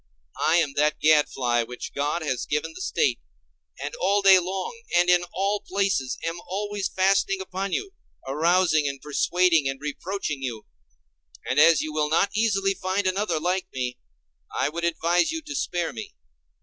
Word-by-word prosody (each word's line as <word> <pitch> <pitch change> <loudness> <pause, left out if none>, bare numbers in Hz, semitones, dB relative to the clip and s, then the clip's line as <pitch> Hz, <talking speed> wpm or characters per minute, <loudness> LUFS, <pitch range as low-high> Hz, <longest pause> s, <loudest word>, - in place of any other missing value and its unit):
I 160 - +3
am 160 -5 +2
that 150 +1 +2
gadfly 135 -6 +3
which 125 +2 -7
God 145 +4 -1
has 130 -5 -2
given 150 - -2
the 370 - -9
State 445 +4 0 0.6
and - - -5
all 200 0 +2
day 190 -1 +8
long 190 - -4
and 175 +1 +5
in 175 0 +4
all 200 +2 0
places 190 -12 -1
am 165 +1 -3
always 205 +1 -2
fastening 195 +1 +2
upon 190 +1 -4
you, 395 - -3 0.3
arousing 155 +2 +2
and 140 -1 -4
persuading 165 +1 +2
and 135 0 -5
reproaching 150 0 -4
you. 120 -5 -5 0.8
And 130 - +1
as 160 0 +6
you 155 0 -4
will 150 -1 0
not 165 +5 +2
easily 195 -3 +2
find 190 +2 -2
another 185 -3 0
like 180 +3 -1
me, 125 -1 -4 0.5
I - - 0
would 170 +2 -3
advise 170 - +1
you 325 - -3
to 295 0 -7
spare 175 - -2
me. 110 - -8
175 Hz, 165 wpm, -25 LUFS, 150-195 Hz, 0.8 s, day